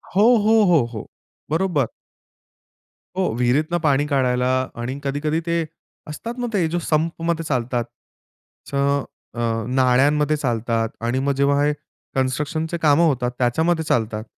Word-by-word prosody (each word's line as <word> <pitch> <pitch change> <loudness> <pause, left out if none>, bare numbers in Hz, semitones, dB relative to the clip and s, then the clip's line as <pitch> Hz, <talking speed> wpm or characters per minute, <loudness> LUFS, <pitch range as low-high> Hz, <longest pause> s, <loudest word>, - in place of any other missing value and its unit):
हो, 205 - +5 0.2
हो, 220 0 +5
हो, 150 -8 +4
हो. 110 - -6 0.4
बरोबर. 160 - +1 1.3
हो, 190 -1 0
विहिरीतून 145 +8 +1
पाणी 145 -2 +2
काढायला 125 -3 +1 0.3
आणि 130 +4 -4
कधी-कधी 150 +3 -1
ते 170 -1 0 0.4
असतात 225 +10 -6
ना, 245 - -2
ते 175 -5 +2
जो 175 +2 -1
संपमध्ये 165 +1 -1
चालतात 125 -4 -1 0.9
च - - -19 0.6
अ, 120 - -7 0.3
नाळ्यांमध्ये 135 +4 +3
चालतात 115 -3 -1 0.2
आणि 120 +2 0
मग 140 +1 0
जेव्हा 140 +1 +2
हे 150 - +2 0.4
कन्स्ट्रक्शनचे 150 +5 -1
कामं 155 +2 +4
होतात, 125 -4 0
त्याच्यामध्ये 160 +7 +1
चालतात. 110 -5 0
145 Hz, 130 wpm, -21 LUFS, 125-160 Hz, 1.3 s, हो